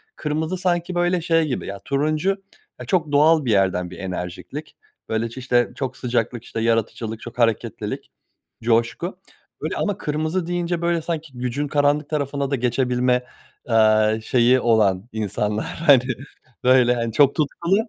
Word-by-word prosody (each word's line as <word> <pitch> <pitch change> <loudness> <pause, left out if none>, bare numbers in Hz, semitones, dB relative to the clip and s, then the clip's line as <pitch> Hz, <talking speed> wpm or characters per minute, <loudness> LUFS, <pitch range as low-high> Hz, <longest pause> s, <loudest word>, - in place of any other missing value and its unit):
kırmızı 155 +4 -2
sanki 175 -1 -1
böyle 175 0 +1
şey 165 0 +2
gibi 130 - -3
ya 100 0 -6
turuncu 155 +5 0 0.5
ya - - -7
çok 165 -6 0
doğal 150 +1 +4
bir 120 - +1
yerden 95 -3 +2
bir 90 - -10
enerjiklik. 95 - -6 0.3
Böyle 110 +1 -1
ç 115 - -13
işte 125 -2 +1
çok 130 -2 -4
sıcaklık 120 -1 -1
işte 115 - -5
yaratıcılık, 115 0 -1
çok 120 - -9
hareketlilik, 115 -2 -1 0.5
coşku. 115 - 0 0.4
Öyle - - -2
ama 205 -3 -1
kırmızı 155 +4 -2
deyince 175 -1 -1
böyle 170 -1 +1
sanki 155 -5 -5
gücün 125 +4 -2
karanlık 145 +1 +1
tarafına 140 -2 -2
da - - +3
geçebilme, 125 0 +1 0.5
eee, 110 -1 +4
şeyi 125 +2 +4
olan 110 -3 +2
insanlar 105 0 -2
hani 140 -6 +4 0.6
böyle 125 -1 +5
hani 115 -1 -2
çok 140 +2 +4
tutkulu 170 +4 0
130 Hz, 150 wpm, -22 LUFS, 115-155 Hz, 0.6 s, böyle